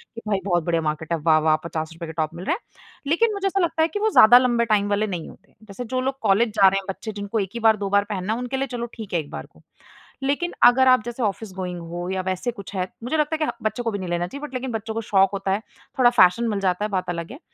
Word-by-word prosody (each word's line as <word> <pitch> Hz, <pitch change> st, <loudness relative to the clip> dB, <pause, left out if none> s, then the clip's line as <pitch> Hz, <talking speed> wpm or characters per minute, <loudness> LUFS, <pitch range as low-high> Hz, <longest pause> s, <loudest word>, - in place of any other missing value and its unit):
कि 230 Hz, -, -7 dB
भई 200 Hz, -2 st, +1 dB
बहुत 175 Hz, -4 st, +1 dB
बढ़िया 165 Hz, 0 st, 0 dB
मार्केट 155 Hz, +1 st, -3 dB
है। 165 Hz, -, 0 dB
वाह-वाह 155 Hz, -1 st, +4 dB
₹50 165 Hz, 0 st, -5 dB
के 160 Hz, -, -7 dB
टॉप 160 Hz, -1 st, -2 dB
मिल 175 Hz, +2 st, -7 dB
रहे 335 Hz, -, +1 dB
हैं। 445 Hz, -, -11 dB, 0.5 s
लेकिन 425 Hz, +9 st, +2 dB
मुझे 395 Hz, -1 st, -1 dB
ऐसा 390 Hz, 0 st, 0 dB
लगता 340 Hz, -3 st, +1 dB
है 320 Hz, -, +4 dB
कि 375 Hz, +5 st, -4 dB
वो 435 Hz, +1 st, +2 dB
ज़्यादा 240 Hz, -, +8 dB
लंबे 240 Hz, -2 st, +2 dB
टाइम 210 Hz, -2 st, +1 dB
वाले 205 Hz, +1 st, +1 dB
नहीं 175 Hz, -5 st, -5 dB
होते। 190 Hz, -, -18 dB
जैसे 215 Hz, +3 st, -8 dB
जो 255 Hz, +2 st, -2 dB
लोग 270 Hz, +1 st, -2 dB
कॉलेज 220 Hz, +2 st, +3 dB
जा 195 Hz, -2 st, +7 dB
रहे 195 Hz, +1 st, +3 dB
हैं 195 Hz, -, -11 dB
बच्चे 220 Hz, +3 st, -5 dB
जिनको 205 Hz, +1 st, -3 dB
एक 195 Hz, -2 st, -2 dB
ही 235 Hz, -, -4 dB
बार 220 Hz, -1 st, +4 dB
दो 200 Hz, -1 st, -3 dB
बार 200 Hz, 0 st, +3 dB
पहनना 200 Hz, 0 st, -2 dB
है, 230 Hz, -, -3 dB
उनके 250 Hz, +2 st, -3 dB
लिए 270 Hz, +1 st, -1 dB
चलो 240 Hz, -1 st, -4 dB
ठीक 220 Hz, -5 st, -8 dB
है 170 Hz, -, +2 dB
एक 150 Hz, -2 st, -7 dB
बार -, -, -6 dB
को। -, -, -23 dB, 0.6 s
लेकिन 290 Hz, +6 st, -1 dB
अगर 260 Hz, +2 st, +6 dB
आप 255 Hz, -4 st, +5 dB
जैसे 240 Hz, +1 st, -4 dB
ऑफिस-गोइंग 190 Hz, -4 st, -3 dB
हो, 175 Hz, +2 st, -6 dB
या 190 Hz, 0 st, -1 dB
वैसे 185 Hz, +6 st, -2 dB
कुछ 200 Hz, -3 st, -10 dB
है, 185 Hz, -1 st, -1 dB, 0.2 s
मुझे 285 Hz, +7 st, -1 dB
लगता 300 Hz, +1 st, +1 dB
है -, -, +3 dB
कि -, -, -1 dB
बच्चों 220 Hz, +3 st, -1 dB
को 230 Hz, -, -1 dB
भी 200 Hz, -, -4 dB
नहीं 185 Hz, -2 st, -5 dB
लेना 175 Hz, 0 st, -1 dB
चाहिए 280 Hz, +10 st, -7 dB
बट 270 Hz, -, -19 dB
लेकिन 255 Hz, 0 st, -3 dB
बच्चों 225 Hz, 0 st, -4 dB
को 225 Hz, -, -2 dB
शौक़ 195 Hz, -3 st, +3 dB
होता 195 Hz, -1 st, -2 dB
है, 200 Hz, +3 st, 0 dB, 0.4 s
थोड़ा 245 Hz, -2 st, +7 dB
फ़ैशन 230 Hz, -1 st, +4 dB
मिल 205 Hz, -2 st, -1 dB
जाता 190 Hz, +1 st, 0 dB
है, -, -, -3 dB
बात 185 Hz, -2 st, -2 dB
अलग 170 Hz, +2 st, -4 dB
है। 275 Hz, -, -10 dB
210 Hz, 290 wpm, -23 LUFS, 185-245 Hz, 0.6 s, ज़्यादा